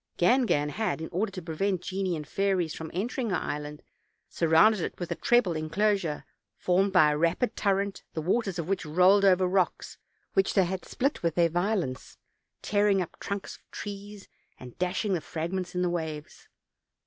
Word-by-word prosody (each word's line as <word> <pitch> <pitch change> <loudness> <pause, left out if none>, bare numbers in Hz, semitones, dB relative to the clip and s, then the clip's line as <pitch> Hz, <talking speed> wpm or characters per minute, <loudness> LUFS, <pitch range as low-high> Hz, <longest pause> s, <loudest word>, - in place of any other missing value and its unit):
Gangan 175 - +3
had, 215 +3 -2
in 160 - -6
order 195 +4 -1
to 185 -2 -7
prevent 180 +3 -1
genii 190 -2 -2
and 150 -2 -6
fairies 190 -3 0
from 160 -1 -7
entering 230 +6 -2
her 185 - 0
island, 150 -2 -4 0.5
surrounded 170 +6 +4
it - - -4
with 175 - -5
a - - 0
treble 240 -8 +2
inclosure, 165 0 0 0.3
formed 190 +2 +2
by 155 -5 +5
a 150 - -1
rapid 170 +9 +1
torrent, 200 -1 0
the 160 - -1
waters 195 +1 0
of 170 -2 -3
which 195 -1 -1
rolled 180 +5 +4
over 185 -1 +5
rocks 185 0 -1 0.3
which 390 - +2
they 190 -3 +5
had 185 +1 -4
split 275 +3 -1
with 170 -2 0
their 170 -1 +3
violence, 175 -6 -2 0.5
tearing 205 -1 +2
up 180 - -5
trunks 200 -1 -5
of - - -35
trees 205 0 -8 0.3
and 125 -1 -11
dash 180 +3 -1
ing 200 - +1
the 175 - 0
fragments 180 +4 -4
in 180 - +1
the - - +2
waves. 160 -3 -5
180 Hz, 180 wpm, -28 LUFS, 165-200 Hz, 0.5 s, by